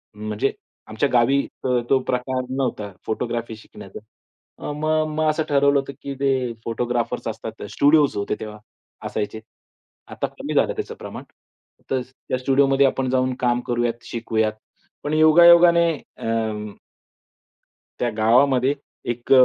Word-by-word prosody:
म्हणजे 105 Hz, +5 st, -1 dB, 0.4 s
आमच्या 110 Hz, +6 st, 0 dB
गावी 125 Hz, +3 st, +4 dB, 0.2 s
अ, -, -, -1 dB, 0.2 s
तो 135 Hz, -, +4 dB
प्रकार 130 Hz, +1 st, -1 dB
नव्हता 125 Hz, -6 st, -2 dB
फोटोग्राफी 115 Hz, 0 st, -3 dB
शिकण्याचा. 110 Hz, -, -12 dB, 0.6 s
अ, -, -, -4 dB
म 155 Hz, +1 st, -4 dB, 0.3 s
मग 155 Hz, 0 st, +2 dB
असं 155 Hz, +1 st, 0 dB
ठरवलं 140 Hz, 0 st, +4 dB
होतं, 140 Hz, 0 st, -6 dB
की 140 Hz, -, -5 dB
ते 130 Hz, -3 st, +1 dB
फोटोग्राफर्स 120 Hz, +1 st, -2 dB
असतात 110 Hz, 0 st, -6 dB
स्टुडिओज 145 Hz, 0 st, +4 dB
होते 100 Hz, -, -1 dB
तेव्हा 105 Hz, -1 st, -7 dB, 0.5 s
असायचे. 110 Hz, +1 st, -3 dB, 0.7 s
आता -, -, -3 dB
कमी -, -, -6 dB
झालं -, -, +3 dB
त्याचं -, -, -5 dB
प्रमाण. -, -, -8 dB, 0.7 s
तर 130 Hz, -1 st, +1 dB
त्या 130 Hz, 0 st, -6 dB
स्टुडिओमध्ये 135 Hz, +1 st, +3 dB
आपण 130 Hz, -1 st, -1 dB
जाऊन 130 Hz, 0 st, +1 dB
काम 120 Hz, -1 st, +1 dB
करूयात, 120 Hz, -1 st, -1 dB
शिकवूयात. 110 Hz, -2 st, -1 dB, 0.5 s
पण 145 Hz, -, -2 dB
योगा-योगाने 170 Hz, +2 st, +7 dB, 0.3 s
अम्म 110 Hz, -2 st, -2 dB, 1.3 s
त्या 120 Hz, -, +1 dB
गावामध्ये 130 Hz, +4 st, +4 dB, 0.4 s
एक 120 Hz, +2 st, -7 dB
125 Hz, 130 wpm, -22 LUFS, 115-140 Hz, 1.3 s, योगा-योगाने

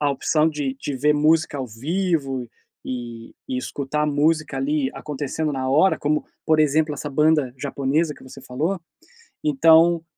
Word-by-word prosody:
a 145 Hz, -1 st, +2 dB
opção 155 Hz, +3 st, +1 dB
de 145 Hz, -3 st, -3 dB
de 145 Hz, -, -3 dB
ver 150 Hz, +3 st, +2 dB
música 155 Hz, 0 st, +2 dB
ao 130 Hz, -, -3 dB
vivo 135 Hz, -, -2 dB, 0.4 s
e 120 Hz, -2 st, -7 dB
escutar 140 Hz, +3 st, -2 dB
música 150 Hz, 0 st, +1 dB
ali 140 Hz, 0 st, 0 dB
acontecendo 150 Hz, +1 st, -3 dB
na 130 Hz, -1 st, -2 dB
hora, 155 Hz, +8 st, +3 dB
como, 150 Hz, +1 st, 0 dB, 0.2 s
por 155 Hz, -1 st, +4 dB
exemplo, 155 Hz, 0 st, +2 dB
essa 145 Hz, +1 st, -6 dB
banda 150 Hz, -2 st, +2 dB
japonesa 145 Hz, +3 st, -1 dB
que -, -, -18 dB
você 130 Hz, +1 st, -12 dB
falou. 155 Hz, +10 st, -2 dB, 0.6 s
Então, 170 Hz, -, +5 dB
150 Hz, 145 wpm, -22 LUFS, 135-160 Hz, 0.6 s, Então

